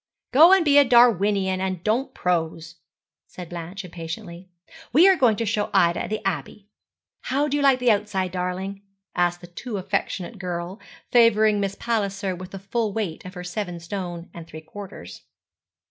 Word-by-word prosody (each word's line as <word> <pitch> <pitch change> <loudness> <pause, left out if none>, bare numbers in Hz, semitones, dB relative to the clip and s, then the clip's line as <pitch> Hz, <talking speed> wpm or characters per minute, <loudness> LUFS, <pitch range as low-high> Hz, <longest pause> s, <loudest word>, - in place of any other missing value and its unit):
'Go 315 +7 +8
and 385 -3 +5
be 290 -1 +6
a - - +7
Darwinian, 205 -6 +3
and 185 -2 -3
don't 230 +5 0
prose,' 165 -1 -2 0.5
said 180 -2 -10
Blanche, 175 +3 -7
impatiently. 170 +1 -8 0.4
'We 330 +10 +7
are 380 - +6
going 245 -9 +3
to 230 - -2
show 210 -1 -1
Ida 170 -3 +3
the 215 -2 -3
Abbey. 195 +4 -4 0.6
How 280 +3 0
do 285 - -1
you 290 - 0
like 275 -2 +5
the 250 -2 +3
outside, 200 -3 -1
darling?' 185 +2 -4 0.3
asked 175 0 +1
the - - -10
too 205 +6 -6
affectionate 195 +1 -3
girl, 180 +2 -5 0.3
favouring 220 -3 +4
Miss 200 -1 -2
Palliser 200 -5 -2
with 180 +1 -9
the 195 - -8
full 210 +3 -2
weight 195 -7 -3
of 185 +1 -9
her 180 - -6
seven 180 -1 -4
stone 175 -1 -6
and 170 -1 -10
three 155 -1 -10
quarters. 170 - -10
195 Hz, 170 wpm, -24 LUFS, 175-220 Hz, 0.6 s, Go